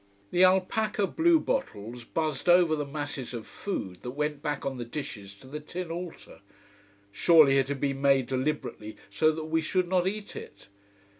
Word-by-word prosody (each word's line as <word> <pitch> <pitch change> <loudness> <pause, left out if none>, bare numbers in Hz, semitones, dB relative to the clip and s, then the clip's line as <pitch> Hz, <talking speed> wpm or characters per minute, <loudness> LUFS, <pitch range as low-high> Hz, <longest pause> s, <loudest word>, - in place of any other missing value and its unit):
The 180 - +4
alpaca 195 +3 +3
blue 330 - +3
bottles 120 - -3
buzzed 155 +2 -2
over 175 -2 +6
the 150 -2 -3
masses 145 -4 -5
of 115 - -6
food 95 - -5
that 125 - -5
went 150 -1 -1
back 150 -2 -3
on 135 -2 -3
the - - -2
dishes 115 -6 -7
to 100 - -17
the 150 +3 -6
tin 170 +3 -6
altar. 175 0 -8 0.7
Surely 140 +4 +6
it 135 - +1
had 140 -1 -3
been 135 -1 -1
made 135 -2 +4
deliberately 130 -5 -3
so 155 +10 +3
that 155 0 -5
we 160 +1 +1
should 180 +3 0
not 180 0 +2
eat 210 +1 -4
it! - - -10
150 Hz, 175 wpm, -28 LUFS, 130-175 Hz, 0.7 s, over